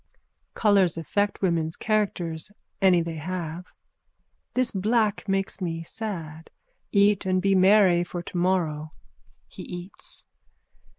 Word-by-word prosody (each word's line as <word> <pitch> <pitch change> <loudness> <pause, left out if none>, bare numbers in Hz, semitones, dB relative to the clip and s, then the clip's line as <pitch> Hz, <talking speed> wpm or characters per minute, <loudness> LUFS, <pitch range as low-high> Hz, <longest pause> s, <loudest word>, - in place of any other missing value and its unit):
Colours 195 -6 +3
affect 205 +6 -1
women's 165 -3 +1
characters, 190 -6 -1 0.3
any 180 -3 +5
they 165 -1 -5
have. 170 +1 -5 0.9
This 255 -1 +1
black 215 +1 0
makes 195 +1 -1
me 165 -2 -3
sad. 165 -6 -6 0.4
Eat 200 -1 +3
and 185 0 +2
be 195 +1 +2
merry 185 -2 +5
for 175 0 -6
tomorrow. 170 -4 -1 0.6
_(He - - -14
eats.) 180 +2 -8
185 Hz, 110 wpm, -26 LUFS, 165-200 Hz, 0.9 s, any